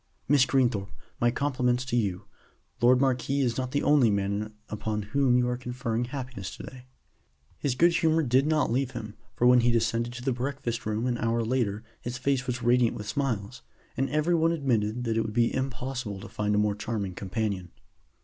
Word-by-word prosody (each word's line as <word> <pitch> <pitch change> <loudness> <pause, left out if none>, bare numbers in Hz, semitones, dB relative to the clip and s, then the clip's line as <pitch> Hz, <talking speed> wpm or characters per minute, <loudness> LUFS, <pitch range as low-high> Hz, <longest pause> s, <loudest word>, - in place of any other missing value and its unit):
"Miss 140 -2 +5
Greenthorpe, 120 -7 +1 0.3
my 120 - +3
compliments 125 -1 0
to 125 - -2
you. 100 -6 -1 0.6
My 120 - +5
lord 125 0 +6
marquis 135 +1 +1
is 120 -3 +1
not 130 -1 -2
the 145 +2 -1
only 145 -6 +5
man 100 +1 -1
upon 105 0 -3
whom 135 -3 +4
you 125 0 +2
are 125 0 -1
conferring 125 -1 -2
happiness 125 -7 -6
to - - -9
day." 130 -1 -11 0.7
His 135 -4 -1
good 170 +6 +5
humor 160 0 +3
did 130 +2 +3
not 155 -6 +2
leave 130 +1 0
him, 110 -3 -6 0.2
for 120 - +1
when 125 0 +7
he 120 0 +3
descended 115 0 0
to 125 0 -8
the 135 - +1
breakfast 125 -2 -3
room 110 +2 -1
an 120 -2 -1
hour 115 0 +1
later 110 -4 0 0.2
his 120 +1 -4
face 130 0 0
was 125 -1 -3
radiant 120 0 +3
with 105 - -7
smiles, 120 -4 -2 0.3
and 135 +1 0
every 155 +3 +1
one 165 0 +3
admitted 120 -6 0
that 115 -2 -1
it - - +3
would 110 -1 -4
be 115 0 +2
impossible 130 -5 -3
to 105 0 -6
meet 105 0 +2
a - - +2
more 105 0 +2
charming 105 -2 -3
companion. 100 -1 -3
120 Hz, 200 wpm, -27 LUFS, 110-130 Hz, 0.7 s, when